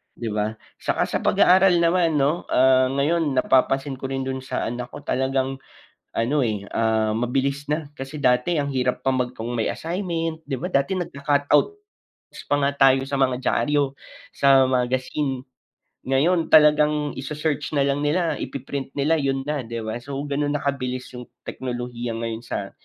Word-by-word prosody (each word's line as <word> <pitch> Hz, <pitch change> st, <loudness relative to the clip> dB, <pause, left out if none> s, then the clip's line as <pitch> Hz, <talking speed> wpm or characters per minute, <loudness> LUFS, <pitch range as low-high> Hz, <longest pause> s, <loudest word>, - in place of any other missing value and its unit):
'di 115 Hz, -2 st, -4 dB
ba? 105 Hz, +1 st, -1 dB, 0.2 s
Saka -, -, 0 dB
sa -, -, -2 dB
pag-aaral 180 Hz, -2 st, +4 dB
naman, 170 Hz, -2 st, +2 dB
'no, 145 Hz, +4 st, +1 dB
ah, 130 Hz, 0 st, +4 dB
ngayon 145 Hz, +2 st, 0 dB
napapansin 135 Hz, +1 st, +2 dB
ko 135 Hz, -, -4 dB
rin 135 Hz, 0 st, -3 dB
dun 130 Hz, 0 st, -3 dB
sa 130 Hz, -, -3 dB
anak 125 Hz, 0 st, -5 dB
ko, -, -, -9 dB
talagang 135 Hz, +1 st, -1 dB, 0.6 s
ano, 125 Hz, +6 st, +1 dB
eh, 105 Hz, -2 st, -3 dB
ah, 110 Hz, -1 st, +1 dB
mabilis 135 Hz, +5 st, -1 dB
na, 150 Hz, 0 st, -2 dB
kasi 145 Hz, +1 st, -8 dB
dati 125 Hz, +7 st, +3 dB
ang 140 Hz, -2 st, -1 dB
hirap 125 Hz, -1 st, -1 dB
pa 135 Hz, -, +2 dB
mag 125 Hz, -1 st, -1 dB
kung 115 Hz, +2 st, -5 dB
may 115 Hz, -2 st, -1 dB
assignment, 165 Hz, -2 st, -3 dB
'di 135 Hz, -, -2 dB
ba? 180 Hz, -, -3 dB
Dati 140 Hz, +7 st, +1 dB
nagka-cut 145 Hz, -4 st, -1 dB
outs 415 Hz, -, +1 dB, 0.5 s
pa -, -, +2 dB
nga 140 Hz, +1 st, +2 dB
tayo 135 Hz, -1 st, +4 dB
sa 140 Hz, 0 st, -3 dB
mga 130 Hz, -2 st, +2 dB
diaryo, 140 Hz, +3 st, +1 dB, 0.4 s
sa 135 Hz, -1 st, +5 dB
magazine. 130 Hz, +1 st, -1 dB, 0.6 s
Ngayon, 160 Hz, +6 st, +1 dB
talagang 150 Hz, -1 st, +4 dB
ise-search 150 Hz, +1 st, -3 dB
na 140 Hz, -, +3 dB
lang 140 Hz, +1 st, 0 dB
nila, 155 Hz, +1 st, 0 dB
ipi-print 135 Hz, 0 st, -5 dB
nila, 155 Hz, +3 st, +2 dB
yun 135 Hz, -1 st, -1 dB
na, 150 Hz, -1 st, -2 dB
'di 115 Hz, -1 st, -5 dB
ba? 110 Hz, +2 st, -4 dB
So, 135 Hz, +3 st, -7 dB
ganun 145 Hz, 0 st, -1 dB
na 145 Hz, -, -3 dB
kabilis 130 Hz, -3 st, -3 dB
yung 125 Hz, -1 st, -9 dB, 0.2 s
teknolohiya 120 Hz, -2 st, -5 dB
ngayon 115 Hz, -1 st, -4 dB
sa -, -, -5 dB
135 Hz, 170 wpm, -23 LUFS, 125-150 Hz, 0.6 s, sa